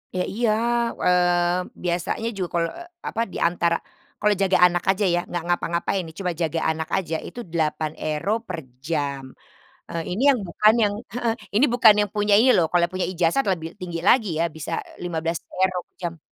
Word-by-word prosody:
Ya, 180 Hz, -, +1 dB
iya, 230 Hz, +4 st, -1 dB, 0.5 s
eee, 175 Hz, 0 st, +3 dB, 0.2 s
biasanya 175 Hz, +5 st, -1 dB
juga 195 Hz, -5 st, -3 dB
kalau, 170 Hz, -1 st, +1 dB
eee, 345 Hz, 0 st, -10 dB, 0.2 s
apa 230 Hz, -, -2 dB
diantara 170 Hz, -1 st, +1 dB, 0.4 s
kalau 210 Hz, 0 st, +3 dB
jaga 195 Hz, -1 st, +3 dB
anak 175 Hz, -1 st, +2 dB
aja 195 Hz, +2 st, +2 dB
ya, 175 Hz, -2 st, +2 dB
nggak 175 Hz, -2 st, -4 dB
ngapa-ngapain 175 Hz, +2 st, 0 dB
nih, 160 Hz, -, -12 dB
cuma 180 Hz, -2 st, -1 dB
jaga 165 Hz, -1 st, -2 dB
anak 160 Hz, 0 st, -4 dB
aja 165 Hz, -4 st, -2 dB
itu -, -, -9 dB
€8 155 Hz, +3 st, -1 dB
per 180 Hz, -3 st, -4 dB, 0.2 s
jam. 140 Hz, -3 st, -3 dB, 0.5 s
Eee, 165 Hz, -, -3 dB
ini 205 Hz, +8 st, -2 dB
yang 275 Hz, -3 st, +5 dB
bukan 210 Hz, +5 st, +4 dB
yang 205 Hz, -1 st, +3 dB, 0.2 s
heeh, 235 Hz, -2 st, 0 dB, 0.2 s
ini 240 Hz, -, +5 dB
bukan 225 Hz, -3 st, +7 dB
yang 205 Hz, -, -8 dB
punya 210 Hz, -1 st, +2 dB
ini 250 Hz, +5 st, +6 dB
loh, 170 Hz, -3 st, +3 dB
kalau 175 Hz, +1 st, +3 dB
punya 185 Hz, 0 st, -1 dB
ijazah 175 Hz, +5 st, +1 dB
lebih 165 Hz, -4 st, -1 dB
tinggi 175 Hz, -2 st, -5 dB
lagi 220 Hz, +1 st, +4 dB
ya 165 Hz, -, +2 dB
bisa 160 Hz, +1 st, -6 dB, 0.3 s
€15 175 Hz, +2 st, -2 dB, 0.2 s
jam. 170 Hz, -2 st, -5 dB
175 Hz, 175 wpm, -23 LUFS, 165-200 Hz, 0.5 s, bukan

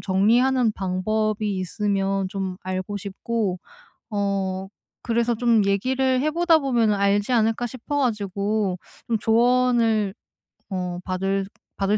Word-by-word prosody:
정리하는 230 Hz, +5 st, +3 dB
방법이 210 Hz, +2 st, -1 dB
있으면 195 Hz, 0 st, -1 dB
좀 190 Hz, -2 st, -4 dB
알고 185 Hz, +2 st, -3 dB
싶고 200 Hz, -1 st, -3 dB, 0.5 s
어 195 Hz, -2 st, -1 dB, 0.3 s
그래서 235 Hz, 0 st, +1 dB
'좀 230 Hz, -3 st, +3 dB
얘기를 255 Hz, +6 st, +1 dB
해 305 Hz, -, +1 dB
보다 335 Hz, 0 st, +4 dB
보면은 235 Hz, -7 st, +2 dB
알지 200 Hz, +3 st, +1 dB
않을까?' 225 Hz, +1 st, +2 dB
싶어 260 Hz, +4 st, -4 dB
가지고 205 Hz, -4 st, -1 dB, 0.3 s
좀 230 Hz, -, +2 dB
조언을 230 Hz, -2 st, +2 dB, 0.6 s
어 180 Hz, -2 st, -3 dB
받을 195 Hz, +1 st, -1 dB, 0.3 s
받을 200 Hz, +2 st, +1 dB
210 Hz, 240 characters per minute, -23 LUFS, 195-235 Hz, 0.6 s, 보다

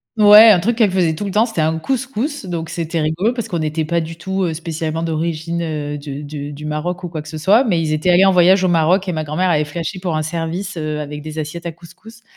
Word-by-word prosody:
Ouais, 210 Hz, +1 st, +8 dB
un 200 Hz, -4 st, +6 dB
truc 225 Hz, +6 st, -1 dB
qu'elle 220 Hz, -4 st, +4 dB
faisait 180 Hz, -3 st, +1 dB
tout 180 Hz, +6 st, -5 dB
le 200 Hz, -, -3 dB
temps, 215 Hz, +4 st, +3 dB
c'était 225 Hz, -9 st, -3 dB
un 160 Hz, +1 st, +1 dB
couscous, 265 Hz, -, -3 dB
donc 165 Hz, -2 st, -4 dB
c'était 165 Hz, -1 st, -3 dB
rigolo, 165 Hz, +10 st, 0 dB
parce 235 Hz, -2 st, -4 dB
qu'on 175 Hz, -6 st, -3 dB
était 155 Hz, +1 st, -2 dB
pas 170 Hz, +2 st, 0 dB
du 165 Hz, +1 st, -7 dB
tout 190 Hz, 0 st, -2 dB
spécialement 160 Hz, 0 st, -4 dB
d'origine 165 Hz, +1 st, -2 dB
de 150 Hz, -3 st, -3 dB, 0.3 s
de 145 Hz, 0 st, -6 dB
du 145 Hz, +1 st, -9 dB
Maroc 170 Hz, +5 st, -3 dB
ou 175 Hz, -, -4 dB
quoi 160 Hz, -2 st, -5 dB
que 150 Hz, -, -13 dB
ce 160 Hz, -1 st, -7 dB
soit, 200 Hz, -, +4 dB
mais 195 Hz, -10 st, +1 dB
ils 155 Hz, -1 st, -1 dB
étaient 155 Hz, +4 st, 0 dB
allés 180 Hz, +2 st, +5 dB
en 195 Hz, -, +5 dB
voyage 185 Hz, +1 st, +4 dB
au -, -, +3 dB
Maroc 175 Hz, +3 st, +2 dB
et -, -, 0 dB
ma 155 Hz, -2 st, -2 dB
grand-mère 175 Hz, +5 st, 0 dB
avait 150 Hz, -2 st, +2 dB
flashé 170 Hz, +5 st, -5 dB
pour 180 Hz, -3 st, -2 dB
un 155 Hz, -, -1 dB
service, 170 Hz, +5 st, -4 dB
heu, 155 Hz, -2 st, -3 dB
avec 150 Hz, 0 st, -7 dB
des 155 Hz, +1 st, -8 dB
assiettes 160 Hz, +3 st, -5 dB
à -, -, -3 dB
couscous, 185 Hz, +8 st, -16 dB
170 Hz, 255 wpm, -18 LUFS, 155-190 Hz, 0.3 s, Ouais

